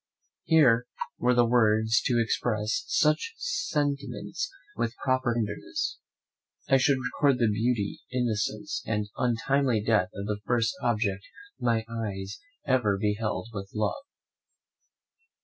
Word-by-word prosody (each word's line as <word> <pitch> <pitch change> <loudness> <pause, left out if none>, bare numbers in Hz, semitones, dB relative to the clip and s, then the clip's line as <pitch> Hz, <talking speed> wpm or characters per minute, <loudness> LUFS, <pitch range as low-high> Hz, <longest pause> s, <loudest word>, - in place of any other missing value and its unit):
Here, 125 -7 +5 0.3
were 125 0 +3
there 120 0 +5
words 110 -1 +3
to 120 -2 +2
express 310 - 0
such 460 -2 +2
sentiments 145 - -2 0.3
with 115 0 -2
proper 130 -2 +1
tenderness, 105 -3 -3 0.7
I 135 - +5
should 135 +1 +3
record 130 +1 +1
the 120 - +2
beauty, 110 -1 0
innocence, 110 -4 -1
and 105 -2 -1
untimely 125 0 +1
death 105 -5 +2
of 100 - -4
the 105 0 -2
first 115 +1 +1
object 105 -5 0 0.4
my 115 -2 +1
eyes 105 -4 -5 0.3
ever 120 -7 +2
beheld 105 +2 -1
with 100 -2 -6
love. 110 - -1
115 Hz, 115 wpm, -28 LUFS, 105-130 Hz, 0.7 s, Here